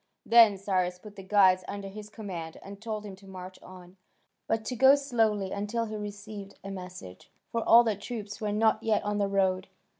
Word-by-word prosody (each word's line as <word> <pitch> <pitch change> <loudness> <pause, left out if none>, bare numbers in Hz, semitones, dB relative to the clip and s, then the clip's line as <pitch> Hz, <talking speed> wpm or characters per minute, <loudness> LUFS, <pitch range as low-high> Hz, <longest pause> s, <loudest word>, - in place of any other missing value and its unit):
Then 225 -3 +7
Cyrus 185 -2 -1
put 205 +2 -13
the 195 - -9
guides 190 -1 +4
under 200 -1 -5
his 210 +2 -9
command, 180 -7 -7
and 200 +1 -10
told 215 -2 -4
him 200 -2 -8
to 195 0 -17
march 185 -1 -10
on, 180 0 -14 0.5
but 220 0 -1
to 250 - -3
go 265 +3 +7
slowly 225 -8 0
until 210 +3 -2
he 215 -1 -6
received 205 -1 -7
a 195 - -6
message, 180 - -9 0.2
for 230 - -1
all 235 +1 +9
the 220 -3 0
troops 210 0 -7
were 210 -1 -1
not 220 +1 +2
yet 220 -2 +1
on 205 0 -1
the 200 - +2
road. 190 -1 +1
205 Hz, 200 wpm, -28 LUFS, 190-220 Hz, 0.5 s, all